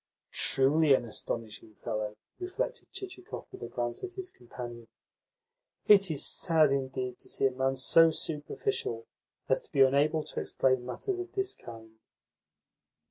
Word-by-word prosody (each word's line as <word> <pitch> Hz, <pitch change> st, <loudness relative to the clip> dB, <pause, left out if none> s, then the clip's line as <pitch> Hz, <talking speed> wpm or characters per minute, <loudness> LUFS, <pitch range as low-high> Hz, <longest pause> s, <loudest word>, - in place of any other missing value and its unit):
"Truly 140 Hz, +2 st, +4 dB
an 120 Hz, -, -2 dB
astonishing 110 Hz, -1 st, -5 dB
fellow!" 105 Hz, 0 st, -4 dB, 0.2 s
reflected 365 Hz, 0 st, -4 dB
Chichikov 370 Hz, -1 st, -7 dB
with 385 Hz, -, -11 dB
a -, -, -4 dB
glance 120 Hz, -1 st, -3 dB
at 370 Hz, -, -5 dB
his 375 Hz, -1 st, -6 dB
companion. 120 Hz, -1 st, -9 dB, 1.0 s
"It 200 Hz, -2 st, +7 dB
is 155 Hz, -3 st, +2 dB
sad 160 Hz, -4 st, +4 dB
indeed 130 Hz, -2 st, -2 dB
to -, -, -8 dB
see -, -, +1 dB
a 135 Hz, -, +4 dB
man 130 Hz, +1 st, 0 dB
so 165 Hz, +5 st, +6 dB
superficial 150 Hz, -, -3 dB, 0.4 s
as -, -, +2 dB
to -, -, -20 dB
be 140 Hz, -, +3 dB
unable 145 Hz, +4 st, +4 dB
to -, -, -5 dB
explain 130 Hz, -2 st, +1 dB
matters 365 Hz, -, -3 dB
of 365 Hz, 0 st, -6 dB
this 390 Hz, 0 st, -1 dB
kind." 110 Hz, -, -12 dB
135 Hz, 145 wpm, -30 LUFS, 120-165 Hz, 1.0 s, It